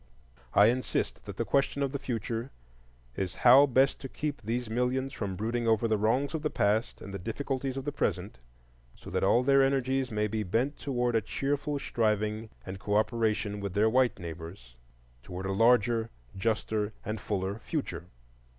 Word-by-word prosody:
I 100 - +8
insist 125 +2 -2
that - - -8
the - - -1
question 140 0 +1
of 135 - -1
the 140 - -3
future 115 -1 -3 0.7
is 95 -2 -3
how 135 +4 +9
best 135 +1 +3
to 135 - -7
keep 145 -3 -4
these 120 +2 -2
millions 125 +4 -1
from 100 -6 -3
brooding 115 +4 -1
over 115 0 +3
the 110 - +2
wrongs 125 +8 +1
of 160 - -2
the 150 - 0
past 105 -1 0
and 100 - -8
the 100 - -4
difficulties 130 +5 -3
of 135 - -4
the 145 - -1
present, 95 - -2 0.6
so - - -11
that 95 - 0
all 120 +6 +4
their 135 +1 +5
energies 135 -1 +1
may 105 -1 0
be 110 +1 -2
bent 115 +9 0
toward 125 -3 0
a 115 - +3
cheerful 145 +5 -2
striving 110 -3 -1 0.2
and 95 0 -6
cooperation 105 0 0
with 100 -2 -5
their 110 +2 +3
white 130 0 +3
neighbors 80 -7 -9 0.5
toward 90 +6 -7
a 95 - -1
larger, 115 +1 +3 0.3
juster, 110 +1 -1
and 110 -1 -3
fuller 100 +1 -2
future. 90 - -4
115 Hz, 175 wpm, -29 LUFS, 105-130 Hz, 0.7 s, how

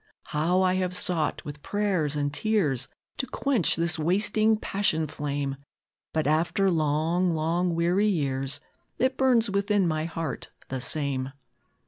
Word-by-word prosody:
How 175 +5 +2
I 185 -1 +3
have 185 -1 -1
sought, 170 -4 0
with 145 0 -7
prayers 190 -8 0
and 145 -1 -1
tears, 150 - +1 0.3
To 260 - -2
quench 255 -6 +1
this 170 0 0
wasting 210 +6 +2
passion 195 -7 0
flame! 145 -2 -3 0.5
But 155 -1 0
after 170 +6 +2
long, 165 +3 +1
long, 170 +2 0
weary 175 +5 +2
years, 135 -7 0 0.4
It 260 +2 +1
burns 245 -5 +3
within 200 -1 +2
my 155 -1 -1
heart 165 -4 -4 0.2
the 130 -1 -3
same." 135 -2 -1
170 Hz, 135 wpm, -26 LUFS, 150-195 Hz, 0.5 s, I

